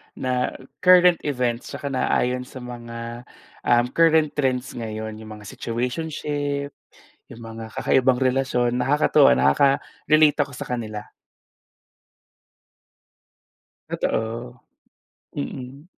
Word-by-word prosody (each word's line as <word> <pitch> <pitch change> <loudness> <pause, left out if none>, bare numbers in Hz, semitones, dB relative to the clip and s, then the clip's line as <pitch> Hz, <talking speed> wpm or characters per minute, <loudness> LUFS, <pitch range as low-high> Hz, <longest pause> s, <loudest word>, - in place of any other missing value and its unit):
na 125 -1 -1 0.2
current 180 -1 +6
events 125 -3 -1
tsaka 140 - -5
naayon 125 -1 0
sa - - -11
mga, 120 0 -8 0.4
um, 120 0 +4
current 160 -2 +4
trends 130 -3 -1
ngayon, 110 -1 -6
'yong 110 - -10
mga 105 0 -13
situationship, 145 +3 -3 0.6
'yong 115 - -11
mga 115 -1 -8
kakaibang 130 -1 +2
relasyon, 130 -2 +1
nakakatuwa, 135 - +4
nakaka-relate 140 - +3
ako 140 -2 -1
sa 125 - -7
kanila. 110 -4 -4 2.8
Totoo. 120 +2 -3 0.8
Mm. 130 - -6
125 Hz, 95 wpm, -23 LUFS, 115-140 Hz, 2.8 s, current